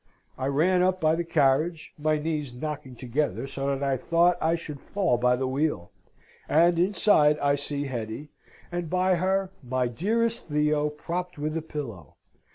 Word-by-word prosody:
I 130 - -3
ran 170 +7 +3
up 185 0 +1
to 155 0 +3
the 170 - -1
carriage, 155 +1 +1
my 155 0 +1
knees 150 -4 -3
knocking 140 -2 -5
together 125 -1 -2
so 135 0 -4
that 140 0 -1
I 135 -1 +1
thought 170 +6 +3
I 165 +1 +2
should 150 -4 -7
fall 185 -12 0
by 125 0 +3
the 130 +1 -2
wheel; 135 - -1 0.6
and 170 +2 +4
inside 170 -5 +4
I 140 -1 +2
see 145 0 -3
Hetty, 120 +2 -5 0.4
and 175 -2 -3
by 185 +1 +2
her 190 +1 0
my 130 -1 -1
dearest 225 - -1
Theo, 150 0 +1
propped 175 +4 -5
with 155 +2 -3
a 165 - -1
pillow. 120 - -7
150 Hz, 165 wpm, -26 LUFS, 135-170 Hz, 0.6 s, and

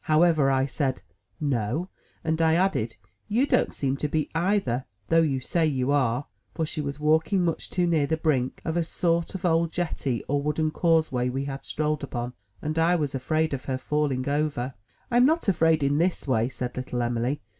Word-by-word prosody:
However, 155 -2 +4
I 135 0 +2
said, 135 -2 -2 0.4
"No," 140 - -1 0.3
and 160 0 0
I 160 0 +4
added, 170 - +1 0.3
"You 235 +6 +2
don't - - +2
seem 135 -1 -1
to 150 - -1
be, 155 +1 -1
either, 165 - +1 0.2
though 165 0 +5
you 140 -5 +1
say 165 +6 0
you 135 -2 0
are;" 130 -2 +1
— - - -43
for 160 - 0
she 155 - -3
was 140 0 -4
walking 160 +5 +2
much 165 - -2
too 180 -1 +1
near 160 -4 +2
the 160 - 0
brink 140 -6 0
of 160 - -1
a 170 - +2
sort 170 +1 -1
of 190 0 -4
old 165 -1 +2
jetty 150 -8 -2
or 145 0 +1
wooden 155 +2 0
causeway 155 -8 +2
we 135 +2 -2
had 135 -1 -5
strolled 150 -1 -1
upon, 120 -3 -4 0.3
and 155 +2 -1
I 170 +2 +4
was 150 -4 -1
afraid 155 +4 0
of 130 - -4
her 130 -1 -1
falling 135 -1 -1
over. 140 -3 -1 0.4
"I'm 245 +2 +5
not 320 -2 +1
afraid 160 -5 +3
in 140 +2 +2
this 175 -3 0
way," 115 -2 +2
said 125 -1 -5
little 125 -1 -2
Em'ly. 120 +4 -1
150 Hz, 200 wpm, -26 LUFS, 130-165 Hz, 0.4 s, though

